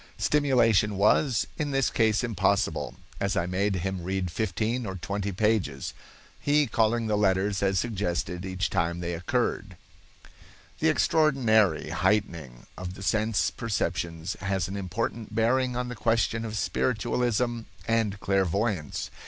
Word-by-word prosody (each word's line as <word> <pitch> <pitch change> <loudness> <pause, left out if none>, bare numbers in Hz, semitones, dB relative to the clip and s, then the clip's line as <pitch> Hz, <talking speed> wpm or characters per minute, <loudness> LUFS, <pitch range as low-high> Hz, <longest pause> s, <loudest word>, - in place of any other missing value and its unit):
Stimulation 115 -8 +3
was, 110 +4 +3
in 150 -2 -1
this 135 -2 +1
case 110 0 +2
impossible, 100 -2 0 0.2
as 100 0 0
I 85 - +1
made 95 +3 0
him 95 0 -2
read 90 0 -2
fifteen 110 +6 -1
or 95 - -4
twenty 100 +3 -3
pages, 95 -8 0 0.5
he 145 +1 +3
calling 115 0 +1
the 105 -1 +1
letters 100 0 +1
as 95 -1 +2
suggested 90 -4 -2
each 95 +1 -2
time 85 +1 0
they 85 0 -3
occurred." 85 +2 -2 1.0
The - - +3
extraordinary 115 - +3
heightening 85 - -1
of 90 0 -6
the 95 - -9
sense 110 +2 +1
perceptions 90 -6 -2
has 95 -2 -1
an 95 - -5
important 105 +3 -4
bearing 125 +3 +2
on 125 0 -2
the 125 - -5
question 115 +1 +1
of 110 -1 -4
spiritualism 120 +1 0 0.3
and 110 -3 +1
clairvoyance. 95 -3 -1
105 Hz, 135 wpm, -27 LUFS, 95-115 Hz, 1.0 s, Stimulation